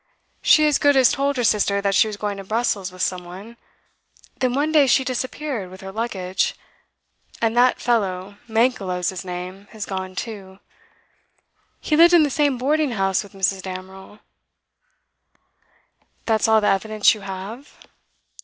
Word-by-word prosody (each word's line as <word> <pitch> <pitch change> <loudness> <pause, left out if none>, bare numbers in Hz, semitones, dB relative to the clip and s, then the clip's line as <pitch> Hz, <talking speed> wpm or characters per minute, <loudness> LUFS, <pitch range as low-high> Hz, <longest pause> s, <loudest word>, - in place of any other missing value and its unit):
'She 305 - +5
as 300 -2 +2
good 285 -1 +4
as 260 -3 +5
told 280 0 -1
her 245 - 0
sister 205 -2 +2
that 200 0 0
she 220 - +4
was 210 -1 -6
going 205 -1 -3
to 195 - -7
Brussels 210 -3 -1
with 185 0 -4
some 180 -1 -2
one. 190 +7 -11 0.8
Then 255 -1 0
one 295 +3 0
day 300 -3 +5
she 265 +1 +3
disappeared, 255 -4 -4
with 185 +2 -12
her 190 0 -8
luggage. 190 -4 -2 0.8
And 225 0 0
that 245 +1 +4
fellow 200 -4 -1
Mankelow's 215 -6 0
his 190 0 -6
name 185 +2 -7
has 215 -2 -5
gone 190 -1 -5
too. 195 -3 -7 1.2
He 305 - 0
lived 340 +2 +7
in 330 - +6
the 290 - 0
same 285 -2 +1
boarding 290 +1 0
house 195 -2 0
with 200 -2 -13
Mrs. 190 0 0
Damerel.' 190 +2 -9 2.1
'That 220 -2 +1
is - - +2
all 220 -1 +4
the 210 - +1
evidence 215 +2 +3
you 215 - -9
have? 195 +8 -8
210 Hz, 165 wpm, -22 LUFS, 190-250 Hz, 2.1 s, lived